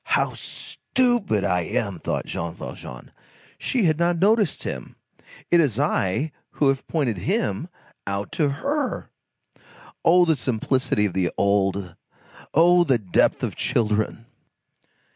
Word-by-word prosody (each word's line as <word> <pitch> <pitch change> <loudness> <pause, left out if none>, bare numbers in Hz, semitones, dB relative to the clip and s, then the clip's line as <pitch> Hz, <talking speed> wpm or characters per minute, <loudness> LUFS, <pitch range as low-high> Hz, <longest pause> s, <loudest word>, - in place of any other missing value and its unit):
"How - - 0
stupid 240 - -1
I 90 0 +1
am!" 85 - -2
thought - - -2
Jean 85 0 -4
Valjean. 60 -6 -9 0.5
"She 250 -4 0
had 160 -3 +2
not 170 0 +2
noticed 205 -1 +2
him. 65 - -6 0.6
It 175 - +6
is 140 -10 +2
I 115 +12 0 0.2
who 145 - +2
have 135 0 -1
pointed 130 - -1
him 100 - -1 0.4
out 100 +1 -3
to 150 -3 +1
her." 280 - -2 0.9
Oh, 175 +1 +6
simplicity 130 -4 0
of 100 - -2
the 90 -2 +1
old! 100 -2 +1 0.6
oh, 175 +3 +6
the 135 -7 +3
depth 100 -5 +1
of - - -1
children! 110 0 0
130 Hz, 125 wpm, -24 LUFS, -, 0.9 s, It